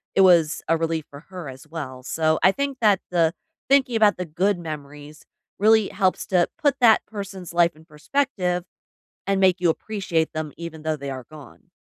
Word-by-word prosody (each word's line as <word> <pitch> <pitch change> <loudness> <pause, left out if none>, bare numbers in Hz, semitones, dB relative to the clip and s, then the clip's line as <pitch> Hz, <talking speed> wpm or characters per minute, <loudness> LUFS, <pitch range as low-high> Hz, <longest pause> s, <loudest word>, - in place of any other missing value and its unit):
it 195 - +5
was 170 -4 +4
a 165 - +3
relief 165 -1 -1
for 140 +1 -12
her 180 -6 -7
as 135 +3 -12
well, 140 -5 -7
so, 155 +2 0
I 190 - +7
think 280 -1 -3
that 205 -4 +4
the 165 -2 +2 0.4
thinking 270 -3 +3
about 210 -2 +4
the 180 - -3
good 180 +5 0
memories 150 -1 -9 0.4
really 220 0 +4
helps 190 -2 0
to 180 -2 +2
put 285 -3 +3
that 225 -2 +6
person's 195 -4 -8
life 170 -1 +3
in 155 - -18
perspective 180 - -1 0.6
and 195 -1 +1
make 185 -1 +3
you 175 - +3
appreciate 170 -3 -1
them 155 -1 -4
even 165 -2 -8
though 155 0 0
they 140 -1 -6
are 130 -2 -7
gone. 150 -5 -14
170 Hz, 190 wpm, -23 LUFS, 155-195 Hz, 0.6 s, I